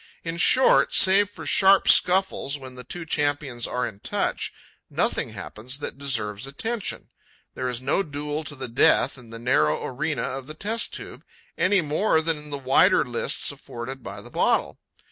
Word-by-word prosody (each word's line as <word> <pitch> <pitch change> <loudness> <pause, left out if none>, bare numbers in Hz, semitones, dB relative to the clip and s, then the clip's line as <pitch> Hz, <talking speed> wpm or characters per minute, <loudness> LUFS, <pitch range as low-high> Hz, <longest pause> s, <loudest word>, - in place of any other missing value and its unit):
In 165 0 -3
short, 255 +9 +4
save 195 +1 +5
for 205 - -10
sharp 195 0 +4
scuffles 180 -6 +3
when 130 -2 -10
the 125 0 -10
two 170 +7 -7
champions 145 -5 -1
are 125 - -2
in 100 -3 -10
touch, - - -2 0.4
nothing - - -1
happens 125 +5 -6
that 140 - -7
deserves 115 -5 -1
attention. 220 +9 -4 0.4
There 130 0 -3
is 125 0 -5
no 135 +8 +1
duel 150 -1 -4
to 145 - -5
the 130 -1 -6
death 120 +1 +3
in 120 -2 -15
the 115 - -8
narrow 75 -11 +1
arena - - -2
of 135 0 -5
the 155 - -8
test 225 +7 -1
tube, - - -9 0.3
any 190 0 +3
more 160 +3 +1
than 160 0 +1
in 150 0 -9
the 145 - -3
wider 135 0 +4
lists - - -1
afforded 130 +3 -8
by 100 -1 -8
the - - -13
bottle. - - 0
140 Hz, 175 wpm, -24 LUFS, 125-170 Hz, 0.4 s, save